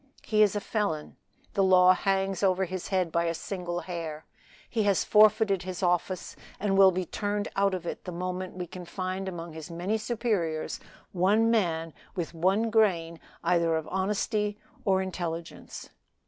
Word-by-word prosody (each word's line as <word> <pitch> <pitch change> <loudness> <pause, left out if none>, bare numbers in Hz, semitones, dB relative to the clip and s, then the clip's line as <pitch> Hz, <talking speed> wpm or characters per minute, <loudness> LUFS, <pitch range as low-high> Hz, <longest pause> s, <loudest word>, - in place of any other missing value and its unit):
He 215 -1 +2
is 210 -1 +4
a - - +1
felon. 200 -8 -2 0.4
The 195 - +2
law 185 -1 +7
hangs 195 0 0
over 190 -1 +2
his 185 0 -5
head 185 -4 0
by 170 +1 +1
a 165 0 0
single 175 -1 -4
hair; 160 -3 -6 0.4
he 225 - -1
has 200 -3 +2
forfeited 215 -2 +5
his 185 0 -5
office, 180 +1 0 0.2
and 200 -1 +1
will 195 -1 +8
be 185 0 -2
turned 205 +3 -2
out 195 -1 +2
of 175 -2 -6
it - - -5
the 180 - -4
moment 180 +1 -4
we 180 - -3
can 180 +1 -9
find 185 +2 -4
among 170 -2 -7
his 160 -1 -8
many 180 +6 -2
superiors 210 -9 -1 0.3
one 205 +5 +3
man 165 -7 0 0.2
with 175 -2 -3
one 195 +7 +1
grain 170 -7 +2 0.2
either 170 -2 +2
of 160 -1 -3
honesty 205 +2 0 0.3
or 190 -2 +3
intelligence." 170 -3 -6
185 Hz, 165 wpm, -28 LUFS, 170-200 Hz, 0.4 s, will